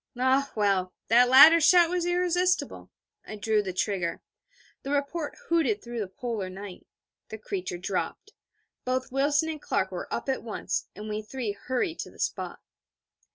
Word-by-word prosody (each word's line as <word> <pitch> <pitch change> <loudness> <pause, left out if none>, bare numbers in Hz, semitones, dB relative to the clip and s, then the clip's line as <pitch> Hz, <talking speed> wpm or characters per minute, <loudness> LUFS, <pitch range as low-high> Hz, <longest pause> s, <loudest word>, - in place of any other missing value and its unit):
Ah 265 +2 +2
well, 195 -4 +1 0.2
that 245 +2 +6
latter 315 +6 +9
shout 345 +2 +6
was 355 -1 -1
irresistible. 360 +1 0 0.3
I 215 - -8
drew 215 0 +1
the 195 -2 -4
trigger. 180 -2 -2 0.6
The 275 - -7
report 290 +2 -2
hooted 275 -12 +1
through 240 0 -6
the 205 - -2
Polar 205 0 -4
night. 190 0 -10 0.4
The 220 - -6
creature 190 -4 -5
dropped; 185 - -4 0.5
both 255 0 -2
Wilson 285 +4 +2
and 310 -2 -5
Clark - - -1
were - - -6
up - - -3
at 265 -1 -1
once: 225 -2 -3
and 210 +1 -8
we 210 0 -3
three 225 0 -4
hurried 260 - -3
to - - -5
the - - -18
spot. - - -3
245 Hz, 160 wpm, -27 LUFS, 205-300 Hz, 0.6 s, latter